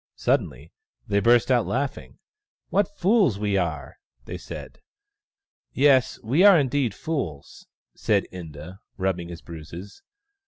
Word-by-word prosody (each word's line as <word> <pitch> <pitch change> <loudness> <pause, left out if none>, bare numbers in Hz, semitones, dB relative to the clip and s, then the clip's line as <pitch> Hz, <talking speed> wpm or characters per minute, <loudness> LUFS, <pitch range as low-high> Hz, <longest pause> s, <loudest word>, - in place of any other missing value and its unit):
Suddenly - - -1 0.3
they 100 -3 +1
burst 120 +4 +4
out 120 -3 +3
laughing. 135 +1 -3 0.3
" 415 - -60
What 205 0 0
fools 190 - +3
we 105 -1 -1
are! 80 -6 -3
" 60 0 -39
they - - -6
said. - - -9 0.5
" 400 0 -73
Yes, 135 -2 +3
we 135 - +2
are 200 -3 +8
indeed 135 -6 0
fools," 95 - -5 0.3
said - - +1
Inda, 85 +1 -9 0.2
rubbing 95 -3 -2
his 85 -1 -9
bruises. 85 +4 -10
105 Hz, 140 wpm, -24 LUFS, 85-145 Hz, 0.5 s, are